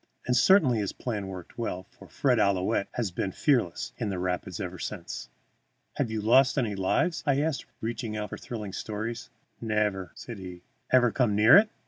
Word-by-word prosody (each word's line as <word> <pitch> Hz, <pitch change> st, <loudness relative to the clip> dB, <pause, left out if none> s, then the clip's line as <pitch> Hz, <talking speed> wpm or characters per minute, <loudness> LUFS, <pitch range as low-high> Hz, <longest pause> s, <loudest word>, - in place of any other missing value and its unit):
And 125 Hz, -, +1 dB
certainly 140 Hz, -, +5 dB
his 100 Hz, -2 st, -2 dB
plan 105 Hz, -6 st, -4 dB
worked 95 Hz, +4 st, -9 dB
well, 95 Hz, -6 st, -3 dB
for -, -, -15 dB
Fred 125 Hz, -4 st, +1 dB
Ouillette 100 Hz, -1 st, +2 dB
has 115 Hz, -6 st, -2 dB
been 95 Hz, +2 st, -2 dB
fearless 95 Hz, -, 0 dB
in -, -, -1 dB
the 95 Hz, -, -2 dB
rapids 90 Hz, -1 st, -3 dB
ever 90 Hz, -2 st, -5 dB
since. -, -, -6 dB, 0.7 s
"Have -, -, 0 dB
you 110 Hz, -1 st, -2 dB
lost 130 Hz, +6 st, +5 dB
any 115 Hz, -6 st, +1 dB
lives?" 100 Hz, -, +1 dB
I 140 Hz, -1 st, +3 dB
asked, 155 Hz, -3 st, -2 dB
reaching 115 Hz, -1 st, -3 dB
out 105 Hz, -1 st, -4 dB
for -, -, -5 dB
thrilling 105 Hz, -6 st, -6 dB
stories. 110 Hz, +2 st, -4 dB, 0.3 s
"Nevair," 105 Hz, -5 st, 0 dB
said 115 Hz, -4 st, -8 dB
he. 90 Hz, -2 st, -9 dB, 0.3 s
"Ever 125 Hz, -2 st, +5 dB
come 120 Hz, -5 st, +1 dB
near 105 Hz, +3 st, +7 dB
it?" 210 Hz, +2 st, +7 dB
110 Hz, 180 wpm, -28 LUFS, 95-125 Hz, 0.7 s, near